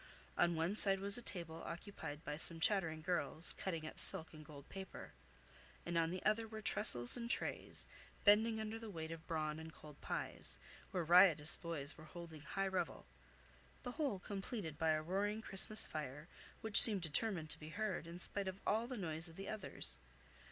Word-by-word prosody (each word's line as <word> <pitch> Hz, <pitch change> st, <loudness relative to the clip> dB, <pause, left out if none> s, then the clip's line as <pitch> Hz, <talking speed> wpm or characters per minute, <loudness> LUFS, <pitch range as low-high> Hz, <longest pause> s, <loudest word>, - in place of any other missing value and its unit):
On 170 Hz, -1 st, +2 dB
one 165 Hz, +4 st, -1 dB
side 195 Hz, -2 st, +2 dB
was 200 Hz, +1 st, -2 dB
a -, -, -9 dB
table 170 Hz, -7 st, -6 dB
occupied 170 Hz, -4 st, -8 dB
by 150 Hz, -, -4 dB
some 165 Hz, +2 st, -1 dB
chattering 160 Hz, -4 st, 0 dB
girls, 175 Hz, -1 st, 0 dB
cutting 165 Hz, -4 st, -4 dB
up 155 Hz, -, -6 dB
silk 160 Hz, -, +4 dB
and 155 Hz, -1 st, -11 dB
gold 145 Hz, -2 st, -13 dB
paper; 190 Hz, -1 st, -9 dB, 0.7 s
and 175 Hz, -, -4 dB
on 165 Hz, -1 st, +2 dB
the 185 Hz, +2 st, -5 dB
other 220 Hz, +2 st, +1 dB
were 220 Hz, 0 st, -8 dB
tressels 120 Hz, -, +3 dB
and 235 Hz, -1 st, -6 dB
trays, -, -, -2 dB, 0.4 s
bending 220 Hz, +2 st, +4 dB
under 220 Hz, +1 st, -5 dB
the 225 Hz, -1 st, -8 dB
weight 160 Hz, -4 st, -6 dB
of 165 Hz, -1 st, -9 dB
brawn 155 Hz, -2 st, -2 dB
and 160 Hz, 0 st, -9 dB
cold 150 Hz, -3 st, -14 dB
pies, -, -, 0 dB, 0.3 s
where 185 Hz, -3 st, -2 dB
riotous 165 Hz, -3 st, +6 dB
boys 160 Hz, -3 st, -4 dB
were 155 Hz, -, -11 dB
holding 165 Hz, -1 st, -10 dB
high 195 Hz, +5 st, -3 dB
revel; 190 Hz, -1 st, -3 dB, 0.8 s
the 245 Hz, -, -5 dB
whole 280 Hz, -7 st, -2 dB
completed 195 Hz, -, -6 dB
by 160 Hz, +1 st, 0 dB
a 155 Hz, 0 st, +1 dB
roaring 200 Hz, +5 st, -1 dB
Christmas 215 Hz, 0 st, +7 dB
fire, 150 Hz, 0 st, -6 dB, 0.3 s
which 220 Hz, -3 st, +10 dB
seemed 210 Hz, -5 st, +7 dB
determined 160 Hz, 0 st, -2 dB
to -, -, -3 dB
be 155 Hz, -, -9 dB
heard, 195 Hz, -2 st, -3 dB
in 170 Hz, +1 st, -8 dB
spite 195 Hz, +2 st, -2 dB
of 190 Hz, +1 st, -5 dB
all 225 Hz, +3 st, 0 dB
the 255 Hz, -1 st, -6 dB
noise 165 Hz, -3 st, -2 dB
of 165 Hz, -, -14 dB
the 195 Hz, +2 st, -8 dB
others. 215 Hz, -3 st, -4 dB
175 Hz, 185 wpm, -38 LUFS, 160-205 Hz, 0.8 s, which